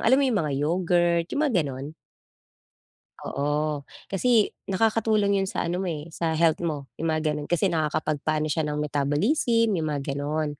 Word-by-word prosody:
ng - - -7
alam 255 +4 +5
mo 280 - +3
'yong 240 -6 +1
mga 150 -3 -2
yogurt, 170 +2 +2
'yung 285 - -1
mga 265 - -1
gano'n. 135 -1 -5 1.4
Oo, 150 +1 -1 0.3
kasi 220 +2 +3 0.2
nakakatulong 215 0 +2
'yon 195 - -1
sa - - -2
ano 175 +2 -2
mo, 190 - -2
eh, 160 0 -5
sa 160 0 -1
health 165 0 +3
mo 150 -6 -4
'yong 165 - -1
mga 155 -1 0
gano'n 150 -1 -4
kasi 175 +2 +1
nakakapagpaano 155 -1 -1
siya 155 0 0
ng 150 - -2
metabolism, 155 - +1
'yong 165 -5 0
mga 145 -2 -2
gano'n. 145 +1 -2
160 Hz, 175 wpm, -25 LUFS, 150-195 Hz, 1.4 s, alam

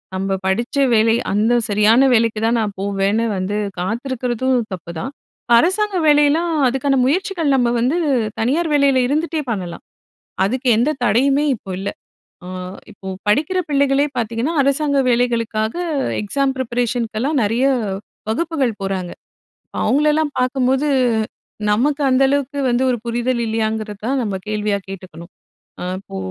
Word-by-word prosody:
நம்ம 195 +1 -1
படிச்ச 230 +9 -1 0.2
வேலை 225 0 +4 0.2
அந்த 215 +4 +2 0.2
சரியான 215 +6 +4
வேலைக்கு 225 -2 +2
தான் 235 +1 +2
நான் 210 -2 -2
போவேன்னு 200 +3 0
வந்து 185 +2 -2 0.2
காத்திருக்கிறதும் 250 +4 -1 0.2
தப்புதான். 170 - -6 0.5
அரசாங்க 380 - +2
வேலையலாம் 295 +3 +4 0.2
அதுக்கான 270 +2 +1
முயற்சிகள், 350 +2 0
நம்ம 245 -2 +2
வந்து 255 +8 +1 0.4
தனியார் 300 +8 +1
வேலையில 280 -3 +4
இருந்துட்டே 310 +3 -1
பண்ணலாம். 180 -5 -5 0.6
அதுக்கு 255 +6 -1
எந்த 245 +6 +2
தடையுமே 270 +6 +3
இப்போ 195 - -11
இல்ல. 195 +1 -3 0.6
அ - - -8 0.4
இப்போ 195 -2 -12 0.2
படிக்கிற 300 - +2
பிள்ளைகளே 280 0 +2
பார்த்தீங்கன்னா, 235 +6 -1
அரசாங்க 280 +1 +1
வேலைகளுக்காக 230 -3 0 0.5
எக்ஸாம் 270 +6 0
ப்ரிப்பரேஷனுக்கெல்லாம் 245 +2 -1
நிறைய 230 +5 +1 0.6
வகுப்புகள் 280 -1 0
போறாங்க. 190 -2 -3 0.7
அவங்களலாம் 300 +1 +2
பார்க்கும்போது, 260 +2 +1 0.8
நமக்கு 285 +7 +1
அந்த 255 +1 +3
அளவுக்கு 285 0 -1
வந்து 240 +1 +1
ஒரு 245 - +1
புரிதல் 240 +1 -1
இல்லையாங்கிறத 220 -1 -2
தான் 270 +2 0
நம்ம 205 -4 -2
கேள்வியா 210 -1 0
கேட்டுக்கணும். 185 -2 -10 0.5
ஆ - - -3 0.2
இப்போ 190 - -9
245 Hz, 125 wpm, -19 LUFS, 215-280 Hz, 0.8 s, வேலை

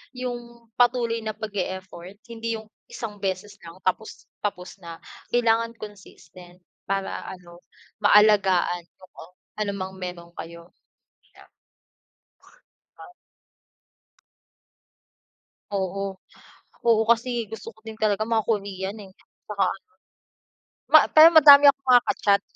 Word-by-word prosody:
yung 240 -2 -8
patuloy 240 -1 +2
na 220 -1 -5
pag-e-effort, 190 -3 -6 0.2
hindi 230 0 -4
yung 220 - -8 0.2
isang 210 -3 -8
beses 200 +1 -4
lang 165 - -12
tapos 190 +4 -3 0.2
tapos 195 -2 -5
na. 170 -2 -11 0.3
Kailangan 230 -1 +1
consistent 185 -4 -14 0.2
para 195 0 -3
ano, 175 -2 -11 0.4
maalagaan, 195 -4 +3 0.2
oo. 180 -1 -15 0.2
Ano 205 -1 -1
mang 190 -1 -7
meron 180 -2 -8
kayo. 170 +1 -10 0.7
Yan. - - -17 1.5
Ah. 355 - -14 2.6
Oo, 195 0 -3 0.7
oo, 225 -1 +4
kasi 235 -1 0
gusto 225 0 -9
ko - - -28
din 220 -1 -10
talaga 215 -1 0
mga 220 -1 -1
Korean 200 -2 -3
eh, 195 - -13 0.4
saka - - 0
ano - - -3 1.1
Ma - - +10 0.2
pero 315 +1 +10
madami 290 -2 +9
akong 275 -1 +3
mga 245 -1 +7
ka-chat. 200 -1 +2
205 Hz, 110 wpm, -24 LUFS, 185-230 Hz, 2.6 s, Ma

